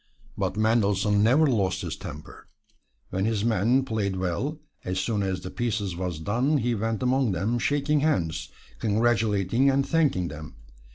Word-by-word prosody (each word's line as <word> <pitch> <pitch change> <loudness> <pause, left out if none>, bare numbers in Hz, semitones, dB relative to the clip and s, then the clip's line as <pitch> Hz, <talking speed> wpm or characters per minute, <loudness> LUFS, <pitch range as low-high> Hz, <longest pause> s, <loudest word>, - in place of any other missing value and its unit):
But - - -2
Mendelssohn 105 -2 +2
never 130 +9 +4
lost 95 -8 0
his 85 -3 -4
temper. 75 -5 -10 0.6
When 95 +1 -1
his 110 -1 0
men 115 +4 +2
played 105 -5 -1
well, 95 - -2 0.2
as 90 0 -2
soon 105 +2 -1
as 95 -2 -2
the 90 - -7
piece 120 -3 -1
was 90 -1 -4
done 120 - +1
he 120 -2 0
went 115 +1 -2
among 125 -4 +2
them 105 +7 -1
shaking 145 +3 +1
hands, 95 - 0 0.3
congratulating 110 +1 +2
and 135 0 +1
thanking 140 - +1
them. 75 -2 -9
110 Hz, 155 wpm, -26 LUFS, 95-125 Hz, 0.6 s, never